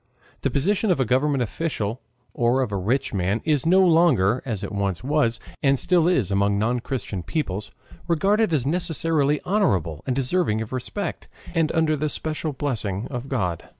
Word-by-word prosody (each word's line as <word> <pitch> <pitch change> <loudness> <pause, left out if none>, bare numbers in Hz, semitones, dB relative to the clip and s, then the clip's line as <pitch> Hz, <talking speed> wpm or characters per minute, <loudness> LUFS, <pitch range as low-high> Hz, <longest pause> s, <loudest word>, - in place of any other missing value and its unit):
The - - +1
position 205 +9 +1
of 180 - +2
a 130 - +2
government 130 +2 +2
official 120 -3 -3 0.3
or 120 +2 +2
of 115 - -4
a - - -2
rich 115 +9 -1
man 95 +3 0
is 155 -2 +1
no 185 +2 +5
longer, 140 - +4
as 110 -5 -3
it - - -4
once 100 -2 -2
was, 130 -5 +1 0.2
and 135 -1 +3
still 175 +2 +2
is 130 - +2
among 100 +1 +2
non 115 +4 +1
Christian 115 -7 -4
peoples, 105 - -3 0.4
regarded 195 +5 +2
as 145 -6 +1
necessarily 155 -2 +1
honorable 95 - +1
and 130 - 0
deserving 135 -3 +1
of 110 +2 -5
respect, 160 +9 -4 0.3
and 165 -3 +1
under 160 -2 +2
the 150 +1 -1
special 155 +1 -3
blessing 115 -8 -3
of 125 +1 -5
God. 90 -10 -2
135 Hz, 175 wpm, -24 LUFS, 105-160 Hz, 0.4 s, no